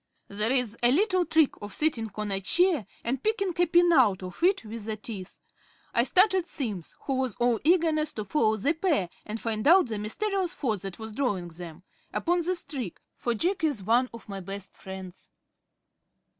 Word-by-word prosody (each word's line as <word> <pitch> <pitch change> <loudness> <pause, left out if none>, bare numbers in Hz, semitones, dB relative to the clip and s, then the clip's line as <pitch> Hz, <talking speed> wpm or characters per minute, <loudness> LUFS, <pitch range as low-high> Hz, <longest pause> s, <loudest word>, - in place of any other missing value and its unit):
There 210 +3 0
is 250 -4 +1
a 240 0 +5
little 370 +3 +3
trick 320 -4 +4
of 205 -1 -7
sitting 250 -8 +1
on 210 -1 -3
a 195 0 -1
chair 340 - +2 0.2
and 250 +3 -1
picking 425 -3 0
a 355 - +3
pin 345 +1 +5
out 210 - +4
of 180 - -8
it 370 - +3
with 220 0 -7
the 220 -1 -3
teeth. 200 -4 -8 0.5
I 235 - +3
started 370 - +3
Simms 210 - -5
who 270 -2 -2
was 260 -5 -1
all 240 -2 +2
eagerness 320 -2 +3
to 215 - -5
follow 220 -2 +2
the 275 +10 +1
pair, 315 - 0 0.2
and 215 +1 -4
find 220 +1 -1
out 350 -4 +6
the 215 -2 -3
mysterious 370 - -2
force 220 - -1
that 195 -2 -6
was 220 0 -7
drawing 205 -8 -1
them 170 0 -10 0.3
upon 350 0 +1
this 350 +1 -1
trick, 250 - -5 0.2
for 240 -1 -1
Jack 360 - 0
is 285 -11 0
one 240 +5 +3
of 230 0 -11
my 200 -2 -5
best 195 +1 -7
friends. 190 -1 -10
240 Hz, 190 wpm, -27 LUFS, 205-330 Hz, 0.5 s, out